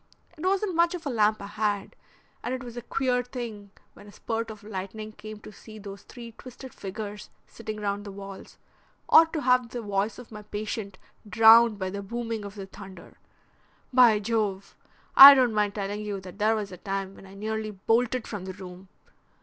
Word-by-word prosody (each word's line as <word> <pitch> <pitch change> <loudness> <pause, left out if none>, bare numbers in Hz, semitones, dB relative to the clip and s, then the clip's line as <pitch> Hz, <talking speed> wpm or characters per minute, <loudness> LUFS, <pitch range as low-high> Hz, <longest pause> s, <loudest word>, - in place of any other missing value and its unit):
It 315 - -11
wasn't 385 +1 0
much 340 +1 +2
of 340 -2 -8
a 280 - -2
lamp 215 -2 +2
I - - -5
had, 205 -1 -2 0.5
and 245 +2 -3
it 260 - -7
was 240 -1 -9
a 240 - -5
queer 250 +1 0
thing 235 -5 -7 0.2
when 205 - -15
a - - -12
spurt 225 +2 -4
of 215 -2 -10
lightning 215 +1 -6
came 215 0 -10
to - - -11
see 215 +1 -13
those 200 -1 -9
three 235 +1 -11
twisted 255 +2 -12
figures 205 +1 -7 0.2
sitting 215 -2 -8
round 205 0 -2
the 205 - -8
walls, 195 0 -10 0.5
or 325 - +7
to 320 -1 -4
have 250 -3 +2
the 240 - -5
voice 205 +1 -1
of 245 -2 -12
my 210 -1 -8
patient 210 -1 -5 0.3
drowned 225 0 +7
by 190 -1 -3
the 200 +1 -5
booming 230 +1 -4
of 200 0 -9
the 195 -2 -7
thunder. 190 0 -13 0.7
By 245 -4 +6
Jove! 205 -2 -2 0.4
I 280 +1 +13
don't 250 -4 +3
mind 210 -1 0
telling 205 0 -3
you 205 -2 -4
that 185 +2 -12
there 215 +2 +3
was 210 -2 -4
a 180 - -9
time 195 +1 -4
when 195 - -14
I 190 - -14
nearly 215 +1 -3
bolted 225 +4 0
from 205 -4 -6
the 190 - -6
room. 185 0 -11
215 Hz, 200 wpm, -26 LUFS, 200-235 Hz, 0.7 s, I